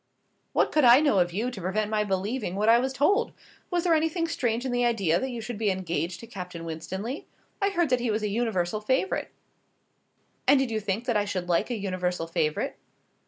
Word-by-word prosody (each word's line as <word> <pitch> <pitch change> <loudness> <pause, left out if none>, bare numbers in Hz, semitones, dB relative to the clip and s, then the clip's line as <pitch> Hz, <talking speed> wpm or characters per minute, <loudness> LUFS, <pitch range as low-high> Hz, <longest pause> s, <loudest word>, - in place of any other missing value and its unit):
"What - - +2
could 305 - +3
I 245 +1 +8
know 285 -10 +3
of 175 -1 +2
you 225 +8 -2
to 210 -6 -8
prevent 210 +4 -1
my 215 -1 +2
believing 200 +1 -2
what 210 +3 +2
I 235 +1 +7
was 260 +2 -1
told? 390 - +2 0.4
Was 350 -2 0
there 350 -2 +3
anything 325 +1 +1
strange 240 -5 -1
in 260 - -1
the 245 0 +1
idea 200 -9 +2
that 265 - -2
you 240 -2 -5
should 220 -1 -6
be 215 -2 +2
engaged 175 -2 -2
to - - -8
Captain 180 -6 -7
Winstanley? 190 - -5 0.3
I 400 - +3
heard 345 -7 0
that 250 - +3
he 240 -1 -1
was 215 0 0
a - - +1
universal 210 -3 -1
favourite." 260 - 0 1.2
"And 280 - +7
did 265 -3 0
you 220 - 0
think 210 +2 -2
that 240 -4 +1
I 205 - +1
should 185 -3 -3
like 175 +7 +2
a 240 - -2
universal 180 -4 -2
favourite?" 155 -2 -1
215 Hz, 215 wpm, -27 LUFS, 185-255 Hz, 1.2 s, I